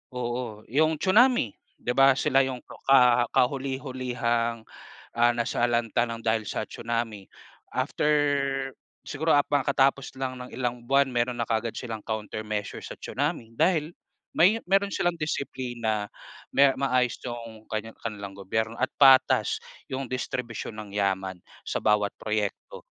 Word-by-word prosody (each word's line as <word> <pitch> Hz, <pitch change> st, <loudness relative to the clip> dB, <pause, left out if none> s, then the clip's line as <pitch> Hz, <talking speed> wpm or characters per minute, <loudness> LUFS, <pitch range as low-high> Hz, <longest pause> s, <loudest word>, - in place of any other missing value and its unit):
oo, 120 Hz, -3 st, -4 dB
yung 155 Hz, +5 st, +2 dB
tsunami, 215 Hz, -, +4 dB, 0.3 s
'di 125 Hz, -, -1 dB
ba, 135 Hz, 0 st, +7 dB
sila 135 Hz, +1 st, +3 dB
yung 130 Hz, -1 st, -3 dB
ka 125 Hz, -3 st, +4 dB
kahuli-hulihang, 125 Hz, -3 st, 0 dB, 0.5 s
ah, 120 Hz, 0 st, +5 dB
nasalanta 120 Hz, 0 st, +1 dB
ng 115 Hz, 0 st, -5 dB
dahil 110 Hz, -1 st, +2 dB
sa -, -, -2 dB
tsunami. 115 Hz, -4 st, -4 dB, 0.5 s
After 130 Hz, +3 st, 0 dB, 1.0 s
siguro 160 Hz, +3 st, +1 dB
hab 145 Hz, -, +3 dB
kakatapos 140 Hz, -1 st, +2 dB
lang 130 Hz, -1 st, -3 dB
ng 125 Hz, -, -8 dB
ilang 125 Hz, -1 st, -2 dB
buwan 140 Hz, +1 st, +5 dB
meron 120 Hz, 0 st, 0 dB
na 120 Hz, -, 0 dB
kaagad 115 Hz, 0 st, 0 dB
silang 115 Hz, -3 st, -5 dB
countermeasure 110 Hz, -1 st, -4 dB
sa -, -, -8 dB
tsunami 140 Hz, -5 st, -3 dB
dahil 160 Hz, +1 st, +1 dB, 0.4 s
may 200 Hz, +7 st, +5 dB
meron 195 Hz, +1 st, +2 dB
silang 175 Hz, 0 st, +1 dB
disiplina. 120 Hz, -8 st, -2 dB, 0.4 s
May 140 Hz, +1 st, +6 dB
maayos 130 Hz, -3 st, +1 dB
yung 115 Hz, -3 st, -7 dB
kaniya 110 Hz, +1 st, -3 dB
kanilang 100 Hz, -3 st, -6 dB
gobyerno 110 Hz, +4 st, -2 dB
at 130 Hz, -, 0 dB
patas 135 Hz, -2 st, +5 dB, 0.3 s
yung 130 Hz, 0 st, -3 dB
distribusyon 120 Hz, -3 st, -4 dB
ng 105 Hz, -1 st, -8 dB
yaman 95 Hz, -2 st, -1 dB, 0.2 s
sa -, -, -2 dB
bawat 105 Hz, -1 st, +3 dB
proyekto. 105 Hz, -2 st, -3 dB
120 Hz, 130 wpm, -27 LUFS, 110-135 Hz, 1.0 s, ba